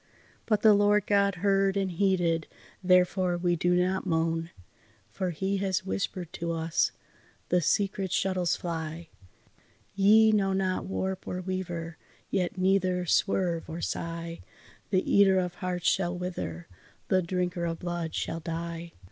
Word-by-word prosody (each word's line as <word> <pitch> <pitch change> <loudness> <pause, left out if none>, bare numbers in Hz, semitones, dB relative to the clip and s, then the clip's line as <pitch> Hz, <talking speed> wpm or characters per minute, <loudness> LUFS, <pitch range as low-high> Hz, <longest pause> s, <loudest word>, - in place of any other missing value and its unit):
But 215 -2 +1
the 215 -1 +8
Lord 205 0 +3
God 200 -1 +2
heard 195 0 +3
and 195 -1 0
heeded, 175 -3 +1 0.4
therefore 180 0 +3
we 175 0 +1
do 175 +2 +2
not 185 +1 +1
moan; 165 0 0 0.6
For 185 -2 -2
He 190 +4 -1
has 190 -1 -1
whispered 185 -3 -3
to 170 0 -3
us, 165 0 +1 0.6
'The 180 0 +3
secret 195 +2 0
shuttles 185 -2 +1
fly, 165 -1 -5 0.8
Ye 215 +3 +6
know 195 -2 +2
not 190 -1 -1
warp 190 0 -3
or 180 - -3
weaver, 175 -3 -4 0.3
yet 185 -1 -1
neither 185 -1 +2
swerve 175 -2 +1
or 160 +1 -5
sigh, 170 0 -4 0.5
The 185 -2 +1
eater 195 -1 +5
of 180 -1 0
hearts 180 -1 0
shall 180 -1 -1
wither, 90 - -5 0.4
the 185 -1 +3
drinker 180 0 -2
of 165 -1 -2
blood 175 -2 -4
shall 165 - -2
die. 165 +1 -5
180 Hz, 140 wpm, -28 LUFS, 170-195 Hz, 0.8 s, the